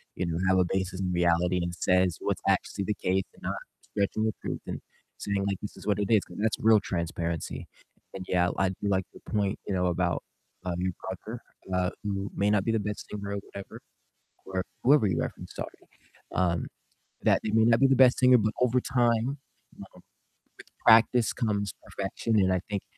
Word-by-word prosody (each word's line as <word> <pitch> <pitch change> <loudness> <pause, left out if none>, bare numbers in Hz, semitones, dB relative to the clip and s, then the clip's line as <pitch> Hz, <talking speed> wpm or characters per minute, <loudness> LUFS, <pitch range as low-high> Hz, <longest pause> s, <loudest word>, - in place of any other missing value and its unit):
you 90 - -1
know, 85 -1 -2
have 95 0 +4
a 90 - +5
basis 95 -1 -2
in 90 -1 -1
reality 90 +1 +2
and 85 0 -2
says 90 -2 +2
what's - - -1
actually 100 - +1
the 105 - 0
case 95 +1 0
and - - -19
not - - -2 0.4
stretching 105 +1 0
the 110 -2 +1
truth - - -4
and - - -4 0.4
saying 100 -1 -1
like, 100 -2 -1
"This 105 - -6
is - - -11
what 105 -1 +1
it 100 - -1
is," 110 -4 +4
'cause 90 - -12
that's 110 0 +1
real 110 -1 +6
transparency. 85 -3 -3 0.5
And 95 -1 -6
yeah, 90 0 +2
I 95 -1 +2
do 100 +2 -4
like 95 -1 +1
the - - -13
point, 100 -2 0
you 100 - -1
know, 90 -1 +1
about, 85 -1 0 0.4
uh, 90 -1 -1
your 90 0 -1
brother, 110 +5 -6 0.3
uh, 90 0 +1
who 100 -1 -3
may 100 +1 +2
not 105 -2 +3
be 115 - +2
the 115 - +1
best 105 0 -4
singer 100 -1 -5
or - - -2
whatever, 100 0 -9 0.7
or 95 -1 -2 0.2
whoever 135 -4 +5
you 85 -3 0
referenced, - - -5
sorry. - - -4 0.6
Um, 85 -3 +1 0.6
that - - +4
they 110 - -2
may 110 0 +5
not 115 +1 +4
be 135 - +6
the 135 - +4
best 130 -1 +6
singer, 125 -1 +6
but 110 0 0
over 125 0 +3
time, 120 -1 +2 0.5
um, - - -8
with - - -18 0.8
practice 115 +1 +6
comes 100 -4 -1
perfection, 105 +3 -1
and 95 -1 +3
I 90 - 0
think, 100 -2 -2
100 Hz, 205 wpm, -28 LUFS, 90-110 Hz, 0.8 s, real